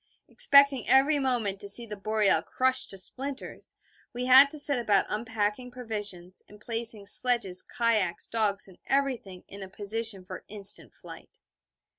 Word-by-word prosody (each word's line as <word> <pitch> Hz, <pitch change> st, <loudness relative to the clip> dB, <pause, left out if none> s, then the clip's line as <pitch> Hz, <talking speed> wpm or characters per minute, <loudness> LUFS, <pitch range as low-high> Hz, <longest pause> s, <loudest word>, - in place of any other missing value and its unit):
Expecting 280 Hz, -3 st, +5 dB
every 280 Hz, +3 st, +3 dB
moment 235 Hz, -7 st, -2 dB
to 200 Hz, -, -2 dB
see 235 Hz, +4 st, +3 dB
the 210 Hz, -2 st, -8 dB
Boreal 210 Hz, 0 st, 0 dB
crushed 260 Hz, 0 st, -1 dB
to 195 Hz, -, -5 dB
splinters, 270 Hz, +8 st, -2 dB, 0.4 s
we 245 Hz, +1 st, -5 dB
had 265 Hz, +2 st, +7 dB
to 305 Hz, -, -8 dB
set 285 Hz, -3 st, +1 dB
about 210 Hz, -4 st, +1 dB
unpacking 220 Hz, +2 st, -3 dB
provisions, 210 Hz, -7 st, -5 dB
and 210 Hz, -, -16 dB
placing 225 Hz, -2 st, -3 dB
sledges, 205 Hz, -4 st, +1 dB
kayaks, 220 Hz, -7 st, -1 dB
dogs 210 Hz, -4 st, -2 dB
and 185 Hz, -, -18 dB
everything 255 Hz, -10 st, -3 dB
in 200 Hz, -, -11 dB
a 190 Hz, -, -9 dB
position 205 Hz, -1 st, -4 dB
for -, -, -10 dB
instant 200 Hz, -1 st, -3 dB
flight. -, -, -14 dB
225 Hz, 150 wpm, -26 LUFS, 200-255 Hz, 0.4 s, had